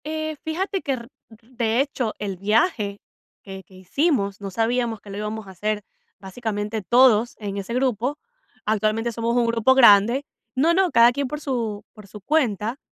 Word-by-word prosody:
Eh, 310 0 -3
fíjate 375 +4 -2
que, 275 - -1
r 235 -2 -6 0.2
de 230 +1 -3
hecho, 260 -5 -2
el 200 -3 -4
viaje 205 - +1 0.4
que 190 -1 -9
que 190 - -23
hicimos, 200 - 0
no 200 - -5
sabíamos 230 +1 0
que 205 - -14
lo 200 - -6
íbamos 210 0 -5
a - - -10
hacer 210 +3 -2 0.4
básicamente 210 +2 -4
todos 240 +1 +4
en 200 -2 -5
ese 200 +3 -5
grupo. 255 +2 0 0.5
Actualmente 215 +2 0
somos 230 +1 -2
un 240 -1 +3
grupo 230 +2 +3
grande 235 +2 +6 0.3
No, 310 +6 +3
no, 375 -2 +2
cada 235 +1 +6
quien 280 +2 -2
por 300 +3 -5
su 230 -8 -3
por 210 -2 -14
su 210 - -11
cuenta, 230 -3 0
230 Hz, 170 wpm, -23 LUFS, 210-260 Hz, 0.5 s, grande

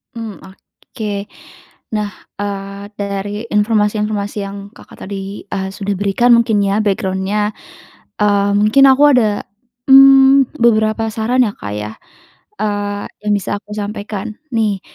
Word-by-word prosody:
Hmm, 225 -3 -6
oke. 200 +2 -7 0.7
Nah, 210 -1 -2 0.3
eee, 200 0 -5
dari 205 +2 -4
informasi-informasi 210 -1 0
yang 200 0 -7 0.2
Kakak - - -13
tadi, 195 +1 -6
eee, 190 -1 -4
sudah 200 0 -3
berikan 205 +5 +3
mungkin 220 -3 +2
ya, 200 0 +1
background-nya, 195 +1 -1 0.7
eee, 205 -1 +2
mungkin 215 +7 +5
aku 265 +2 +3
ada, 215 -5 +1 0.4
mmm, 270 0 +7
beberapa 220 -1 +2
saran 245 +3 +2
ya 205 - -4
Kak 105 - -7
ya, 105 +1 -5 0.7
eee, 205 -1 -2 0.2
yang 210 - +1
bisa 205 0 -2
aku 205 0 -23
sampaikan, 205 0 -5 0.2
nih. 210 -4 0
205 Hz, 125 wpm, -16 LUFS, 200-220 Hz, 0.7 s, mmm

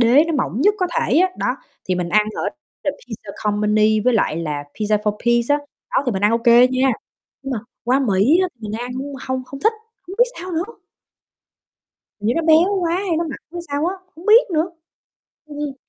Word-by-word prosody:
đế 245 +6 +6
nó 330 - -2
mỏng 255 -2 -1
nhất 410 +7 +4
có 365 - +1
thể 290 - +2
á, 370 +2 +4
đó, - - 0 0.3
thì 185 - +2
mình 180 -1 -2
ăn 210 +4 +3
ở - - -3 0.4
The 285 - +2
Pizza 220 -6 -10
Company 210 +1 +2
với 250 +4 +2
lại 205 -8 +1
là 150 -3 -3
Pizza 210 0 +1
4P's 235 +4 +1
á, 290 - +4 0.3
đó - - +2
thì 245 - +1
mình 190 0 -3
ăn 210 - +5
ô 230 - +3
kê 240 +1 +6
nha, 260 +1 +2 0.5
nhưng 270 - -4
mà 240 - -1 0.3
qua 250 +3 +3
Mỹ 230 - +3
á 370 - +1
mình 210 -2 -6
ăn 245 +1 -5 0.4
hông 260 0 -2
không 275 +2 -9
thích, 440 - +3 0.3
hông 375 - -7
biết 485 - +7 0.2
sao 365 +1 -6
nữa. 325 0 0 1.6
Hình 205 - -3
như 235 - +2
nó 330 - +1
béo 330 +5 +4
quá 340 -1 0
hay 370 -3 -1
nó 340 - 0
mặn 310 - -6
hay 350 - -5
sao 285 +2 -1
á, 365 - -1 0.2
hông 335 - -12
biết 440 0 +6
nữa. 325 +2 +1 0.8
ừm. 295 -2 -5
255 Hz, 215 wpm, -20 LUFS, 215-330 Hz, 1.6 s, biết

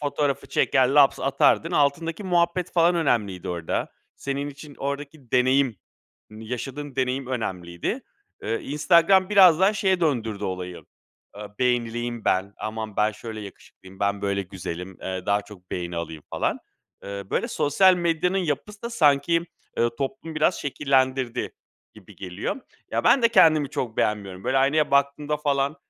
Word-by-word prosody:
fotoğrafı 145 -1 -1
çeker 130 -2 +2
laps 140 0 +4
atardın. 155 +4 +2
Altındaki 165 +5 0
muhabbet, 175 0 +1
falan, 170 0 +4
önemliydi 105 - 0
orada. 85 -2 -3 0.2
Senin 140 +1 -3
için 145 0 -12
oradaki 140 -1 -5
deneyim, 130 -1 +3 0.5
hani 110 +1 -11
yaşadığın 135 +3 -5
deneyim 130 0 -1
önemliydi. 90 -9 -3 0.4
Iıı, 115 +1 -1
Instagram 170 +6 +3
biraz 185 -5 +7
daha 195 +2 +5
şeye 190 -3 +1
döndürdü 115 - -1
olayı, 90 -1 -5 0.5
ııı, 105 0 -9
"Beğenileyim 120 -1 -1
ben. 95 +2 0
Aman 110 -1 -5
ben 105 +1 +2
şöyle 110 0 -8
yakışıklıyım, 95 -1 -13
ben, 100 0 0
böyle, 100 0 0
güzelim, 90 0 -7
eee, 95 -1 -5
daha 100 0 +2
çok 100 -3 -15
beğeni 85 -1 -4
alayım." 80 -2 -5
falan. - - -1 0.5
Eee, 100 0 -6
böyle, - - 0
sosyal 185 +6 +4
medyanın 175 +2 0
yapısı 180 +5 -3
da 235 - -4
sanki, 165 -2 +3 0.3
ııı, 115 0 +1
toplumu 140 +4 -4
biraz 155 +3 +2
şekillendirdi 130 -3 0 0.4
gibi - - -16
geliyor. 90 +1 -4 0.3
Ya, - - -1
ben 265 - +5
de 235 - +6
kendimi 160 -9 +5
çok 120 -6 -4
beğenmiyorum. 100 -3 -2
Böyle, 135 - +2
aynaya 145 +3 +2
baktığımda, 140 +2 +1
falan, 140 0 0
135 Hz, 145 wpm, -24 LUFS, 105-155 Hz, 0.5 s, biraz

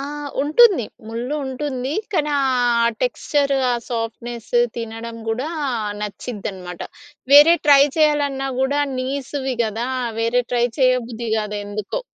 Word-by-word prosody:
ఆహ్, 290 +1 -5
ఉంటుంది 355 - +5 0.2
ముళ్ళు 240 +6 -4
ఉంటుంది 265 0 -3 0.2
కానీ 300 -4 0
ఆ 275 - +1 0.6
టెక్స్చరు, 285 - 0
ఆ - - +2
సాఫ్ట్‌నెస్సు, 235 0 -2 0.2
తినడం 230 0 -6
గూడా 250 +7 -2 0.5
న‌చిద్దనమాట. 200 -4 -6 0.5
వేరే 295 +4 +9
ట్రై 280 -1 +8
చేయాలన్నా 290 -3 +1
గూడా 280 +2 +1 0.2
నీసివి 265 0 -3
గదా! 225 +3 -3 0.3
వేరే 235 +2 +1
ట్రై 240 -1 +2
చేయబుద్ధి 245 -3 +1
గాదు 210 -1 -3
ఎందుకో. 210 - -4
255 Hz, 115 wpm, -21 LUFS, 230-285 Hz, 0.6 s, వేరే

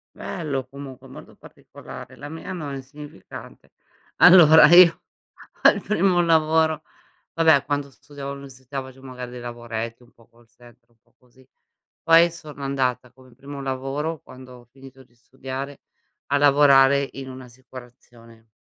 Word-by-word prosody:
Bello 140 -6 -5
comunque, 135 -1 -11
molto 130 - -14
particolare. - - -13
La 145 +1 -10
mia 160 +3 -9
no, 155 -6 -6
è - - -5
insignificante. 145 +2 -12 0.4
Allora, 160 -4 +8
io, 175 0 +6 0.6
al - - +5
primo 185 -3 +1
lavoro 160 -1 +2 0.5
vabbè, 160 -4 +3
quando 145 -1 -4
studiavo 140 0 -10
all'università, 135 -1 -9
facevo 130 0 -14
magari 125 -1 -9
dei 125 - -9
lavoretti, 120 -1 -7
un 120 - -23
po' 115 - -25
call 115 0 -26
center, 120 0 -21
un 115 - -35
po' - - -38
così. 125 +1 -26 0.6
Poi 165 +1 +5
sono 150 -4 -12
andata, 130 -2 -2
come 130 -1 -21
primo 140 +2 -10
lavoro, 135 +4 -4
quando 130 0 -14
ho 120 - -19
finito 135 0 -16
di 120 -1 -28
studiare, 135 +3 -9 0.5
a 140 - 0
lavorare 140 -1 +4
in 135 0 -9
un'assicurazione, 120 -3 -15
135 Hz, 140 wpm, -22 LUFS, 125-145 Hz, 0.6 s, Allora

